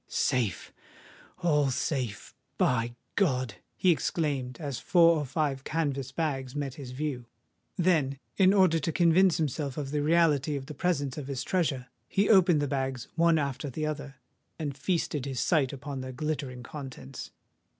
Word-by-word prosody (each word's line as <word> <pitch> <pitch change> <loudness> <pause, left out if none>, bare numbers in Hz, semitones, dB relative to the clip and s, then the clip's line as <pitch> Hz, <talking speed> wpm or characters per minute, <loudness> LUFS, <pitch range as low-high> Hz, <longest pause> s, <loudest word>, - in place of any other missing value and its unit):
"Safe!—all 140 - -2
safe—by 120 -2 -2 0.2
God!" 130 - +1 0.2
he 185 - +4
exclaimed, 145 -6 -1
as 140 -6 -4
four 170 -2 +5
or 150 - -2
five 140 -2 -1
canvass 140 -5 -2
bags 135 -4 -2
met 140 -3 -2
his 135 -2 -8
view. 130 -2 -4 0.5
Then, 160 -7 +2 0.2
in 190 -1 +5
order 185 -5 +4
to 160 +2 -1
convince 175 +1 +4
himself 145 -3 -2
of 140 -2 -3
the 150 0 0
reality 150 -2 +3
of 135 -1 -4
the 150 - -7
presence 145 -4 -1
of 140 - -7
his 135 -2 -3
treasure, 150 -9 0 0.2
he 200 +1 +1
opened 180 -7 +5
the - - 0
bags 130 -3 -2
one 170 0 +4
after 140 -1 -2
the 155 +4 -3
other, 145 -2 -4 0.4
and 145 -4 -3
feasted 150 -2 -1
his 130 -2 -3
sight 150 -7 +2
upon 140 0 -6
their 130 0 -6
glittering 140 -3 -3
contents. 130 - -8
145 Hz, 150 wpm, -29 LUFS, 130-165 Hz, 0.5 s, four